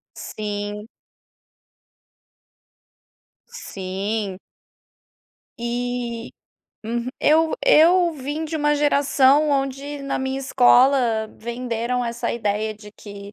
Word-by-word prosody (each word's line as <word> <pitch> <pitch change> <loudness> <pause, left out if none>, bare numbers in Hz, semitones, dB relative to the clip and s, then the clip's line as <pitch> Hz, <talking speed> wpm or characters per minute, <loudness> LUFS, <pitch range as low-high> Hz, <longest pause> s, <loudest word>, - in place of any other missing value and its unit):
Sim. 210 0 -5 2.6
Sim. 195 - -4 1.2
E 240 -1 -3 0.6
uhu 235 +2 -3
eu 315 +1 +3
eu 350 -5 +5
vim 290 +2 -4
de 315 +1 -4
uma 295 -1 +2
geração 285 0 +3
onde, 275 +1 -2
na 275 - -2
minha 265 0 -2
escola 250 -3 +3
venderam 235 +1 -3
essa 235 0 -3
ideia 215 -1 -2
de 210 -1 -14
que, 200 -1 -11
245 Hz, 85 wpm, -22 LUFS, 220-285 Hz, 2.6 s, eu